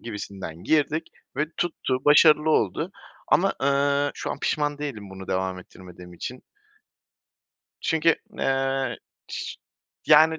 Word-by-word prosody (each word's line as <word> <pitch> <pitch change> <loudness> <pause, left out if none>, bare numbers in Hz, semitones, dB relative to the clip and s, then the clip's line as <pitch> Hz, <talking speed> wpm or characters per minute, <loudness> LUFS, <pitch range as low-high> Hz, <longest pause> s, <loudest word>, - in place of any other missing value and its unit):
gibisinden 100 -6 -7
girdik 155 +1 +2 0.3
ve 150 +2 +1
tuttu, 150 -6 -1
başarılı 150 +1 +6
oldu 150 - +1 0.4
ama, 195 +2 +4
ııı, 140 +1 +2
şu - - -4
an - - -4
pişman 145 -1 0
değilim 115 -10 -5
bunu 95 0 -9
devam 95 0 -1
ettirmediğim 90 -1 -13
için. 125 +8 -7 1.4
Çünkü, 160 0 +3 0.2
eee, 135 -2 0 0.3
şı - - -5 0.5
yani, 160 +1 +6
140 Hz, 115 wpm, -25 LUFS, 100-150 Hz, 1.4 s, başarılı